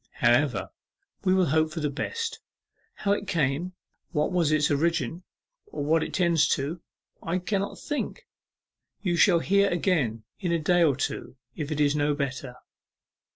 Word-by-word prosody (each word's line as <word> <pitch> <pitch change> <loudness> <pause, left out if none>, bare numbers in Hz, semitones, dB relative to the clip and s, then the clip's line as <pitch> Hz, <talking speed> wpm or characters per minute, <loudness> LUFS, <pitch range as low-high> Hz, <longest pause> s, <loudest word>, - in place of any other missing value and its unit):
However, - - +2 0.5
we 185 -1 +3
will 185 -1 +4
hope 155 +1 +2
for 165 - -4
the 150 -2 -1
best. 460 - -3 0.6
How 200 - -1
it 205 0 0
came, 165 +1 0 0.4
what 150 +1 +1
was 170 -4 +2
its 155 0 +2
origin, 165 +1 0 0.5
or 280 - -5
what 160 +2 +3
it - - -3
tends 170 -4 +3
to, 150 +5 -4 0.4
I 170 +2 -1
cannot 195 +2 -2
think. 295 - -4 0.8
You 175 -4 +1
shall 170 0 +5
hear 200 +2 +3
again 155 - 0 0.2
in 180 -4 -1
a 170 - +3
day 175 +3 +2
or 150 -5 +4
two, 135 0 -4 0.2
if 150 -2 -4
it 150 - -2
is 145 0 +3
no 145 0 +1
better... 135 -3 -4
165 Hz, 160 wpm, -27 LUFS, 145-180 Hz, 0.8 s, shall